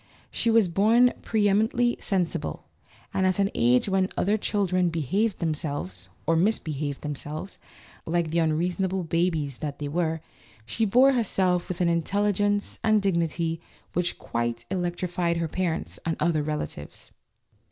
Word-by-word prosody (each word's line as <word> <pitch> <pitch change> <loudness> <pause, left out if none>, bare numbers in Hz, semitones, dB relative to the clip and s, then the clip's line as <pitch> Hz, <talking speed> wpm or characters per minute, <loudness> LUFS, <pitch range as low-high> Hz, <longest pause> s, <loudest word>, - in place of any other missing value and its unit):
She 230 - 0
was 225 -3 +5
born 225 +8 +4
preeminently 220 +3 +2
sensible, 185 -4 -2 0.5
and 190 -1 +2
at 185 - +1
an 200 0 +1
age 125 - +3
when 190 -1 +1
other 205 +3 +2
children 185 -4 +1
behaved 185 - 0
themselves 145 - -3 0.2
(or 165 - +3
misbehaved 155 -6 0
themselves) 150 +4 -6 0.5
like 165 -1 0
the 170 - +2
unreasonable 180 +4 0
babies 160 -5 0
that 145 -2 -4
they 145 - -4
were, 160 +1 -1 0.4
she 225 - 0
bore 250 +6 +5
herself 185 -7 +1
with 185 -1 -3
an 175 - +3
intelligence 205 +4 +1
and 215 -1 +4
dig 195 -2 +1
nity 165 0 -1 0.3
which 175 0 -1
quite 120 0 -3
electrified 175 -1 -1
her 165 -1 -1
parents 170 0 -3
and 165 -1 -1
other 165 -3 +2
relatives. 150 - -5
175 Hz, 140 wpm, -26 LUFS, 155-200 Hz, 0.5 s, was